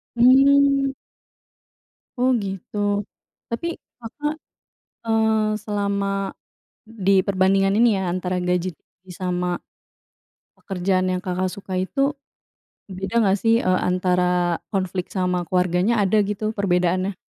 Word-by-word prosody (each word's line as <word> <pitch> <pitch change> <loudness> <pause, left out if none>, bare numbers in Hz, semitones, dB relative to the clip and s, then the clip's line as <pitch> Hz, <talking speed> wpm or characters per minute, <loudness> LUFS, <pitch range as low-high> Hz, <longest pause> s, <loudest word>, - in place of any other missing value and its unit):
Mmm. 275 +2 +5 1.2
Oh 250 +1 +2
gitu, 195 +1 -6 0.7
tapi 235 +9 -3 0.3
Kakak, 295 +6 -4 0.7
eee, 220 -1 +2 0.3
selama, 200 -1 -1 0.8
di 215 -4 0
perbandingan 195 0 +2
ini 235 -2 +5
ya 190 -2 -1
antara 185 0 -2
gaji 180 0 0 0.5
sama, 180 -1 -2 1.1
pekerjaan 185 -1 -1
yang 185 - 0
Kakak, 185 0 -1
suka 195 0 -8
itu, 275 +9 0 0.7
beda 190 +2 -6
nggak 195 -4 +3
sih, 230 +1 +4
eee, 185 -4 +1
antara 180 -1 +1 0.2
konflik 185 -2 -2
sama 180 -2 0
keluarganya 180 +5 +1
ada 200 +1 +2
gitu 210 +2 -3
perbedaannya? 185 0 0
195 Hz, 105 wpm, -22 LUFS, 180-225 Hz, 1.2 s, Mmm